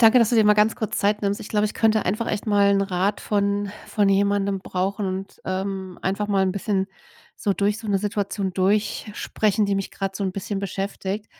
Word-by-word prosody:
Danke, 230 +2 +7
dass 230 -1 +4
du - - +2
dir 220 - +5
mal 210 0 +6
ganz 210 +1 +3
kurz 220 -4 -2
Zeit 210 +1 +1
nimmst. 200 0 0
Ich - - -8
glaube, 210 0 +2
ich 210 - -6
könnte 220 -1 +2
einfach 215 +5 -1
echt 210 +1 -2
mal 205 -1 +4
'n 200 0 +3
Rat 195 +1 0
von 200 -1 0 0.2
von 205 -2 +2
jemandem 200 0 +2
brauchen 195 +2 -2
und, 190 +1 -5
ähm, 190 -1 -3
einfach 200 +2 -1
mal 195 -2 +2
'n 190 -1 +1
bisschen 195 0 -1 0.5
so 200 - 0
durch 205 +2 0
so 220 - -8
'ne 200 -1 +2
Situation 200 -1 -2
durchsprechen, 210 +2 0
die 200 - +1
mich 195 -1 -2
gerade 195 -1 -4
so 200 - -2
'n 190 - -1
bisschen 195 +1 -3
beschäftigt. 195 +1 -3
200 Hz, 215 wpm, -23 LUFS, 195-210 Hz, 0.5 s, Danke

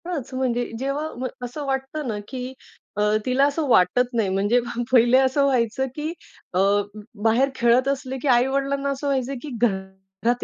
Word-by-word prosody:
हाच, 300 -8 -4
म्हणजे 245 -2 0
जेव्हा 275 +4 -2
म्ह 255 +1 -2 0.2
असं 285 +4 -6
वाटतं 270 +2 -3
ना 215 -3 -2
की 255 0 -6 0.4
अ, - - +1 0.2
तिला 260 +2 +3
असं 290 +1 -1
वाटत 240 +2 +4
नाही, 225 -4 +1
म्हणजे 200 +5 +2
पहा, 240 0 -4
पहिले 245 0 +6
असं 265 +2 +3
व्हायचं 260 0 +1
की 305 +1 -3 0.4
अ, 180 - +1 0.6
बाहेर 235 +5 +3
खेळत 240 +2 +3
असले 270 -1 -2
की 290 - -2
आई-वडिलांना 275 +2 +2
असं 275 +1 -3
व्हायचं 270 -1 0
की 300 - -7
घरात 190 +2 -1
255 Hz, 165 wpm, -23 LUFS, 235-275 Hz, 0.6 s, पहिले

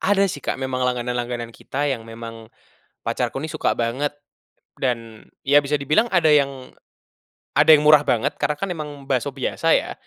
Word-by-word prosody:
Ada 200 0 +3
sih, 145 - -7
Kak, - - -2
memang 130 -1 -3
langganan-langganan 120 -1 -2
kita 145 +5 -4
yang 115 -6 -2
memang 115 -1 -9 0.5
pacarku 135 - -2
ini 160 - -4
suka 155 - 0
banget, 130 +5 -2 0.6
dan, 115 -4 -3 0.2
ya 145 +1 +5
bisa 145 0 -1
dibilang 150 - +2
ada 170 -4 +4
yang 140 -3 +1 0.8
ada - - +3
yang 150 - -1
murah 150 -1 +8
banget 140 0 0
karena 150 - 0
kan 195 +4 -3
emang 150 -4 -7
bakso 135 +1 0
biasa 135 -1 +1
ya, - - -3
135 Hz, 165 wpm, -22 LUFS, 120-150 Hz, 0.8 s, murah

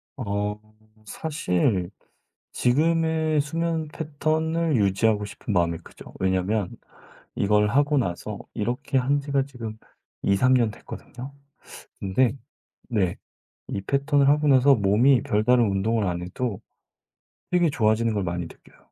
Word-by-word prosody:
어 105 -3 -2 0.5
사실 95 - -1 0.6
지금의 160 +3 +2
수면 160 +1 -2
패턴을 155 +1 -1
유지하고 105 +1 +2
싶은 105 +2 -6
마음이 85 -2 +1
크죠. - - -14
왜냐면 95 +1 0 0.7
이걸 105 +1 +2
하고 145 +5 +2
나서 105 -2 -2
이렇게 120 +5 -2
한 135 +3 +2
지가 140 -1 0
지금 115 -5 -8 0.5
2-3 125 +7 +3
년 115 -3 +2
됐거든요. 130 +5 -10 0.7
근데 120 +6 +1 0.5
네 95 -7 0 0.6
이 - - -1
패턴을 140 +4 +2
하고 150 +1 +3
나서 135 +1 +6
몸이 115 +5 +4
별다른 120 +4 +3
운동을 105 +2 0
안 90 -1 -2
해도 100 +4 -4 0.9
되게 175 -2 +3
좋아지는 110 -2 +2
걸 105 - -1
많이 85 0 -2
느껴요. 80 - -14
120 Hz, 245 characters per minute, -25 LUFS, 100-145 Hz, 0.9 s, 나서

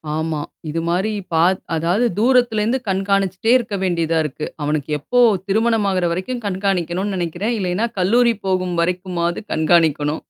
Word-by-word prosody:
ஆமா, 160 -1 -2 0.3
இது 160 +2 -2
மாரி 185 +5 0 0.2
பா 160 0 +4 0.3
அதாவது 175 +9 +1
தூரத்திலிருந்து 240 0 +2
கண்காணிச்சிட்டே 195 +1 0
இருக்க 225 -4 -4
வேண்டியதா 165 -3 0
இருக்கு. 150 +1 -5 0.2
அவனுக்கு 150 0 -2
எப்போ 245 - +1 0.3
திருமணம் 220 +1 +1
ஆகிற 185 -2 0
வரைக்கும் 230 +8 -4
கண்காணிக்கணும்னு 190 0 -1
நினைக்கிறேன். 180 +7 -2
இல்லன்னா 190 +4 0
கல்லூரி 235 +6 +3
போகும் 185 -2 0
வரைக்குமாவது 175 -1 -2
கண்காணிக்கணும். 155 -2 +2
185 Hz, 130 wpm, -20 LUFS, 170-210 Hz, 0.3 s, பா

